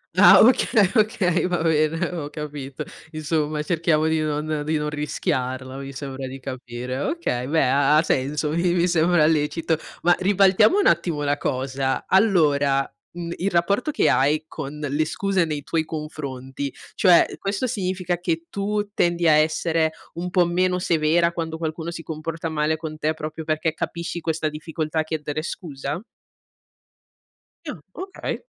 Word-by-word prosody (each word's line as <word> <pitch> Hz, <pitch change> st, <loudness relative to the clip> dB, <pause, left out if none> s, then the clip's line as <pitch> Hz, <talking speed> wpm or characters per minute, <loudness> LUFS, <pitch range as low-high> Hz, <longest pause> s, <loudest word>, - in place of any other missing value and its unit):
Ah -, -, +8 dB
okay, 220 Hz, -4 st, +4 dB
okay, 200 Hz, -6 st, +2 dB
va 175 Hz, -2 st, -1 dB
bene, 160 Hz, +1 st, +2 dB
ho 160 Hz, -5 st, -5 dB
capito. 150 Hz, -2 st, -6 dB, 0.3 s
Insomma 155 Hz, -1 st, -1 dB
cerchiamo 160 Hz, -1 st, +1 dB
di 160 Hz, 0 st, +1 dB
non 155 Hz, 0 st, -1 dB
di 155 Hz, +1 st, 0 dB
non 150 Hz, 0 st, -2 dB
rischiarla, 130 Hz, -3 st, -3 dB
mi 135 Hz, 0 st, -7 dB
sembra 135 Hz, -1 st, -6 dB
di 135 Hz, +1 st, -8 dB
capire. 130 Hz, -1 st, -6 dB
Okay, 140 Hz, -, -2 dB
beh 155 Hz, -1 st, +2 dB
ha 140 Hz, +3 st, +4 dB
ha 155 Hz, -, +4 dB
senso, 150 Hz, +1 st, 0 dB
mi 170 Hz, +2 st, +1 dB
mi 175 Hz, 0 st, +3 dB
sembra 170 Hz, -1 st, +3 dB
lecito. 160 Hz, +1 st, +1 dB, 0.3 s
Ma 175 Hz, +1 st, +5 dB
ribaltiamo 195 Hz, -, +4 dB
un 410 Hz, -, +2 dB
attimo 170 Hz, -3 st, +2 dB
la 145 Hz, 0 st, +1 dB
cosa. 135 Hz, 0 st, -2 dB
Allora, 145 Hz, -, +3 dB, 0.3 s
mhmm, 170 Hz, -1 st, -5 dB
il 195 Hz, +3 st, 0 dB
rapporto 200 Hz, -, +1 dB
che 300 Hz, -, +2 dB
hai 150 Hz, +4 st, +2 dB
con 150 Hz, -2 st, -7 dB
le 145 Hz, +3 st, 0 dB
scuse 195 Hz, +1 st, 0 dB
nei 150 Hz, -3 st, -4 dB
tuoi 160 Hz, +1 st, 0 dB
confronti, 140 Hz, -3 st, -5 dB, 0.2 s
cioè, 180 Hz, -4 st, +5 dB
questo 195 Hz, +5 st, -2 dB
significa 185 Hz, -5 st, -2 dB
che 170 Hz, -2 st, -2 dB
tu 205 Hz, +1 st, -1 dB
tendi 175 Hz, -3 st, +1 dB
a -, -, +7 dB
essere 160 Hz, +1 st, +2 dB, 0.2 s
un 175 Hz, +2 st, -4 dB
po' 180 Hz, -1 st, +3 dB
meno 180 Hz, +1 st, +1 dB
severa 170 Hz, 0 st, +2 dB
quando 165 Hz, -1 st, -4 dB
qualcuno 160 Hz, 0 st, -4 dB
si 165 Hz, -1 st, -7 dB
comporta 165 Hz, +1 st, -5 dB
male 155 Hz, 0 st, 0 dB
con 155 Hz, -1 st, -7 dB
te, 155 Hz, 0 st, 0 dB
proprio 155 Hz, +1 st, -6 dB
perché 155 Hz, 0 st, 0 dB
capisci 170 Hz, +2 st, -4 dB
questa 160 Hz, -1 st, -1 dB
difficoltà 155 Hz, +1 st, -3 dB
a -, -, +2 dB
chiedere 155 Hz, -1 st, -3 dB
scusa? 145 Hz, -3 st, -5 dB, 1.7 s
Ah, 210 Hz, -, -5 dB
okay. 375 Hz, +3 st, -5 dB
160 Hz, 155 wpm, -23 LUFS, 150-175 Hz, 1.7 s, Ah